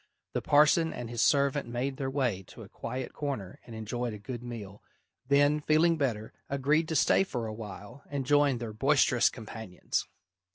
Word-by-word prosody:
The - - -1
parson 155 +3 +4
and 120 -1 -6
his 120 -1 -1
servant 140 -1 +3
made 130 +3 -2
their 135 -1 -2
way 130 -8 0
to - - -11
a - - -11
quiet 130 0 -5
corner 135 -11 -4
and 115 - -9
enjoyed 115 +2 -3
a - - -6
good 120 +3 -7
meal, 110 -5 -8 0.5
then, 145 +2 +4
feeling 155 +3 +3
better, 120 -8 -2 0.2
agreed 145 +4 +2
to 160 - -2
stay 155 - +4
for 125 -11 -4
a 110 - -4
while 110 +4 -9
and 140 -2 -3
join 145 -1 +4
their 115 -2 -5
boisterous 135 0 +3
companions. 110 -4 -4
130 Hz, 175 wpm, -30 LUFS, 115-145 Hz, 0.5 s, parson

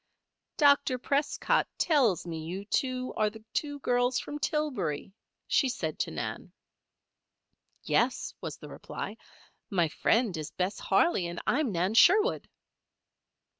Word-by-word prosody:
"Dr. 285 -3 +4
Prescott 280 +3 +1
tells 255 - +2
me 165 -2 -5 0.4
you 255 -1 -4
are 215 - +2
the 220 +1 -13
two 290 -1 -2
girls 245 0 +1
from 295 0 -6
Tillbury," 205 - -2 0.3
she 270 - +2
said 250 - -3
to - - 0
Nan. - - -5 1.3
"Yes," - - +1
was - - -5
the - - -11
reply. - - -7 0.5
"My 175 -5 +1
friend 225 +3 +1
is 155 -2 -5
Bess 185 +2 -2
Harley 195 - +2
and 170 0 -5
I 265 - +2
am 285 -7 0
Nan 180 +3 0
Sherwood." 385 - +4
245 Hz, 130 wpm, -29 LUFS, 185-285 Hz, 1.3 s, Dr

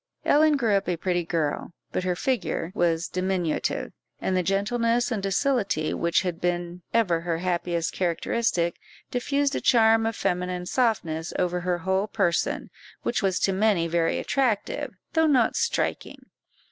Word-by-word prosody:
Ellen 300 0 +4
grew 230 -6 +1
up 195 -2 +1
a 175 - 0
pretty 175 0 0
girl, 165 0 -2 0.2
but - - -2
her 180 -1 +1
figure 225 -7 -1
was 170 -1 +1
diminutive, 185 -3 -1 0.3
and 190 - -1
the 185 - +3
gentleness 230 +6 +1
and 215 -4 -1
docility 195 - 0
which 170 +2 +1
had 180 -3 -3
been 175 0 -2
ever 185 -8 +2
her 170 -1 -1
happiest 170 -1 -1
characteristic, 175 0 0 0.3
diffused 280 +3 0
a - - -1
charm 225 -2 +4
of 225 - -2
feminine 180 -2 -1
softness 175 -9 0
over 180 -1 0
her 180 0 -1
whole 190 +3 0
person, 190 -5 0 0.3
which 240 - 0
was 190 -3 +1
to 195 - +2
many 190 -4 +2
very 165 0 +1
attractive, 240 -7 -1 0.2
though 320 -1 +4
not 260 -6 +3
striking. 470 0 -1
185 Hz, 150 wpm, -26 LUFS, 175-225 Hz, 0.3 s, Ellen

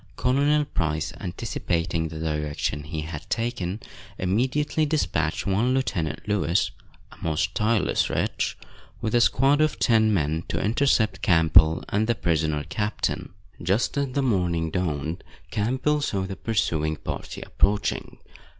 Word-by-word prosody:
Colonel 145 +4 +2
Price, 80 - -2
anticipating 85 -4 -2
the 80 0 -7
direction 75 -2 -2
he 80 0 -4
had 75 -1 -7
taken, 110 -5 -2 0.4
immediately 130 - +1
dispatched 80 - 0
one 110 +7 +2
Lieutenant 90 -13 -2
Lewis, 100 -4 +1 0.4
a - - -14
most 90 +5 0
tireless 110 -2 +1
wretch, - - -1 0.4
with 110 - -2
a 120 - +5
squad 135 +5 +4
of 155 0 +2
ten 110 -2 +4
men, 80 -4 +1
to - - -2
intercept 110 -3 +2
Campbell, 80 -2 +5
and 105 +2 +1
the 120 - +2
prisoner 80 -5 0
captain. 105 +4 -2 0.3
Just 95 - +1
as 140 -2 -1
the 140 - +1
morning 90 -8 +1
dawned, 80 -2 -2 0.3
Campbell 130 +8 +1
saw 100 -8 -1
the 95 0 -5
pursuing 80 -9 0
party - - -6
approaching. 100 +1 0
95 Hz, 130 wpm, -25 LUFS, 80-120 Hz, 0.4 s, a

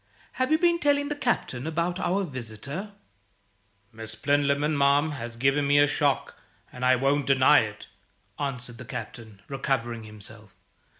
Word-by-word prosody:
"Have 255 +2 -1
you 315 - +5
been 340 0 +3
telling 285 -2 +2
the 295 - -2
Captain 160 - -1
about 170 +3 -1
our 195 +2 0
visitor?" 140 - -5 1.0
"Miss 110 0 -8
Plinlimmon, 145 +4 +1
ma'am, 140 +2 +3
has 120 -5 -6
given 135 +4 +2
me 145 +1 +4
a 145 - +7
shock, 145 -1 0 0.3
and 125 - -7
I 130 0 +5
won't 135 +2 +1
deny 135 +2 +6
it," 105 -2 -4 0.5
answered 125 -4 -4
the 125 - -8
Captain, 110 -2 -8
recovering 120 -5 -2
himself. 105 -1 -10
140 Hz, 145 wpm, -26 LUFS, 115-155 Hz, 1.0 s, a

